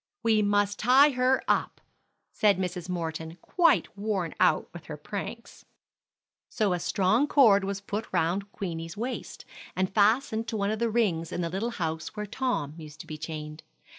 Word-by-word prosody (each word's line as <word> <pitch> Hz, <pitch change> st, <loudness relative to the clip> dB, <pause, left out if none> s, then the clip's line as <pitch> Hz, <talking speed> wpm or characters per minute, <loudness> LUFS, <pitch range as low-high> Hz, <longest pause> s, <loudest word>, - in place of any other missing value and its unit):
"We 220 Hz, -2 st, +3 dB
must 205 Hz, 0 st, +1 dB
tie 265 Hz, +6 st, +6 dB
her 255 Hz, 0 st, +2 dB
up," -, -, 0 dB, 0.5 s
said 205 Hz, -3 st, +3 dB
Mrs. 180 Hz, -1 st, -4 dB
Morton, 160 Hz, -1 st, -4 dB
quite 335 Hz, -, +2 dB
worn 200 Hz, -5 st, -2 dB
out 155 Hz, -, +3 dB
with 175 Hz, -, -10 dB
her 150 Hz, -, -6 dB
pranks. 205 Hz, +8 st, -7 dB, 0.9 s
So 210 Hz, -5 st, +1 dB
a 175 Hz, -, -1 dB
strong 210 Hz, +10 st, +2 dB
cord 220 Hz, -10 st, +5 dB
was 200 Hz, 0 st, -3 dB
put 205 Hz, +2 st, -4 dB
round 190 Hz, +5 st, 0 dB
Queenie's 165 Hz, -2 st, -5 dB
waist, 245 Hz, +4 st, -5 dB, 0.3 s
and 185 Hz, +1 st, -1 dB
fastened 220 Hz, +2 st, +2 dB
to 225 Hz, -, -3 dB
one 200 Hz, 0 st, 0 dB
of 215 Hz, -, -2 dB
the 235 Hz, 0 st, +1 dB
rings 190 Hz, -8 st, 0 dB
in -, -, -2 dB
the 170 Hz, -1 st, -2 dB
little 200 Hz, +6 st, -2 dB
house 160 Hz, -7 st, -4 dB
where 210 Hz, -1 st, -3 dB
Tom 225 Hz, -, -2 dB
used 155 Hz, -1 st, -11 dB
to -, -, -12 dB
be 155 Hz, -2 st, -8 dB
chained. 155 Hz, -1 st, -6 dB
200 Hz, 170 wpm, -28 LUFS, 165-225 Hz, 0.9 s, tie